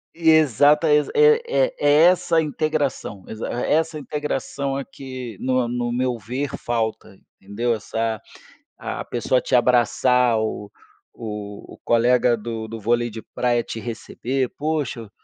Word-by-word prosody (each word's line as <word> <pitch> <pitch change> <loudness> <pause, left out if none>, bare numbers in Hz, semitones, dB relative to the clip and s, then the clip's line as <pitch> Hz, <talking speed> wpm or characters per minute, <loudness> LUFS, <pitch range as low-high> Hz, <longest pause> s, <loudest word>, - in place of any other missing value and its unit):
Exata 155 -1 +4
exa 150 0 +2
é 450 +1 +6 0.3
é - - -29
é 145 - +3
essa 175 -2 +4
integração. 150 - -2
Exa 110 +1 -5 0.2
essa 160 +1 +1
integração 140 -2 -3
aqui, 130 -5 -7
no 130 -2 +1
no 120 0 -2
meu 125 -1 -1
ver, 125 +7 -3
falta, 110 -4 -3 0.2
entendeu. 115 +5 -1
Essa 110 0 -3 0.6
a - - -5
pessoa 125 +1 0
te 130 - +1
abraçar, 125 0 +3
o 105 -2 -3 0.4
o 105 -2 -8
o - - -17
colega 120 +1 +3
do 110 0 -6
do 115 0 -6
vôlei 120 +2 0
de 110 +1 -7
praia 120 -2 +1
te 115 - -6
receber: 125 +3 -3
"Poxa, 145 -8 -3
125 Hz, 135 wpm, -22 LUFS, 115-145 Hz, 0.6 s, é